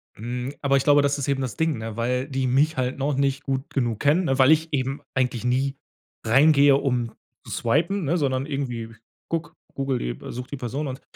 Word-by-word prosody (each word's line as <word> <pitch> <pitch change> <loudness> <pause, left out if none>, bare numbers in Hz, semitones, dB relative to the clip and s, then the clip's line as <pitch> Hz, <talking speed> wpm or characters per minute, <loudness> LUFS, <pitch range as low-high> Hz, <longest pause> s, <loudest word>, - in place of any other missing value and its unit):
Mhm, 125 +4 -4
aber 140 -1 +3
ich 135 - +1
glaube, 145 -1 +5
das 140 0 +1
ist 140 - -3
eben 135 -1 0
das 125 -4 -4
Ding, 160 -5 +1
ne? 110 -1 -6
Weil 125 +3 -1
die 135 -2 -1
mich 145 +5 +2
halt 130 0 -1
noch 140 +1 0
nicht 140 +1 0
gut 135 -1 -3
genug 120 -5 0
kennen, 155 +6 +3
ne? 135 -2 0
Weil 130 +3 +7
ich 160 +1 +3
eben 135 0 -1
eigentlich 125 -3 0
nie 130 +3 0 0.5
reingehe, 140 +3 +6
um 125 -4 0 0.3
zu - - -9
swipen, 165 +11 0
ne? 170 +5 +1
Sondern 135 -3 0
irgendwie 120 -6 -4 0.3
gucke, 165 0 -3 0.2
Google 135 -2 -1
die - - -3 0.2
äh, - - -6
suche 125 +1 -7
die 145 - -5
Person 135 +4 -3
und 130 +1 -6
135 Hz, 215 wpm, -24 LUFS, 125-145 Hz, 0.5 s, Weil